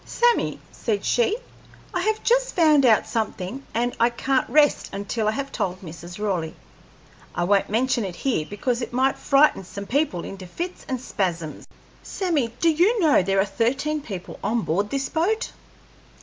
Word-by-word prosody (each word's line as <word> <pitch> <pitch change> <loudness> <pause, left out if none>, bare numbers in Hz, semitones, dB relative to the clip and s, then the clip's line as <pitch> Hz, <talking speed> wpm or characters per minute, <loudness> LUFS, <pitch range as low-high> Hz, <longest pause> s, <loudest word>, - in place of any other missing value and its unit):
"Sammy," 480 0 +1
said 210 -4 -2
she, 245 - +2 0.6
"I 360 - 0
have 435 +3 0
just - - +2
found 305 -6 +5
out 220 -2 +5
something, 220 +1 -3
and 240 +2 -1
I 235 +1 +5
can't 260 +2 0
rest 295 -1 +3
until 205 +2 -2
I - - +3
have 275 +3 -4
told 185 0 -2
Mrs. 170 +1 -9
Raleigh. 185 -6 -2 0.8
I 175 - 0
won't 195 +2 +2
mention 240 +2 +1
it 185 -3 -5
here, 225 - -1
because 235 +4 -1
it 240 - -5
might 265 +2 +2
frighten 275 -7 +4
some 200 +2 -7
people 270 - 0
into 190 -2 -8
fits 350 - -6
and 260 -1 -1
spasms. 170 -9 -3 0.3
Sammy, 330 - -1
do 335 - +4
you 375 +9 +3
know 315 - +5
there 195 +1 +1
are 195 - +4
thirteen 270 +9 0
people 195 -9 -7
on 230 +1 +1
board 200 +6 0
this 275 +2 -1
boat?" 425 +9 0
240 Hz, 170 wpm, -24 LUFS, 195-300 Hz, 0.8 s, found